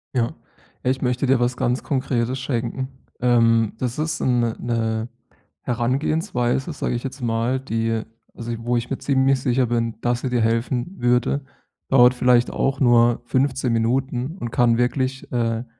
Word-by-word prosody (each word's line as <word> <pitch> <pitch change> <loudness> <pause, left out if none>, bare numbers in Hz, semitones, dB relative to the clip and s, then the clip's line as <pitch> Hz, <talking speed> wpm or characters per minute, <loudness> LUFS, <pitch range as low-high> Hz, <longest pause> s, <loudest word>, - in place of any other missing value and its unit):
Ja. 115 -2 +1 0.5
Ja, 130 - +2
ich 130 - -3
möchte 125 +1 0
dir 130 -1 +3
was 125 +1 0
ganz 125 +1 0
Konkretes 130 -2 -1
schenken, 130 0 -2 0.3
ähm, 115 -3 +3
das 125 +1 -3
ist 160 +1 -2
‘n 125 -1 +2
‘ne 115 -1 0
‘ne 115 -1 -1 0.5
Herangehensweise, 125 +2 0
sage 145 - -2
ich 120 - -4
jetzt 135 +1 -6
mal, 120 +2 0
die 115 -3 -1 0.3
also, 120 0 -5
wo 120 +1 0
ich 120 0 -3
mir 135 - -3
ziemlich 135 -1 +2
sicher 125 0 +2
bin, 115 -1 -1
dass 120 0 0
sie 130 - -2
dir 120 -2 +1
helfen 115 +2 0 0.2
würde, 125 +3 +2 0.5
dauert 125 -2 +6
vielleicht 125 -1 +3
auch 135 0 -1
nur 120 -2 +4
15 130 -1 0
Minuten 130 +6 -1
und 120 -9 -5
kann 120 -1 +3
wirklich, 130 +2 -1
äh, - - -4 0.2
‘n 115 - -6
125 Hz, 165 wpm, -22 LUFS, 115-130 Hz, 0.5 s, dauert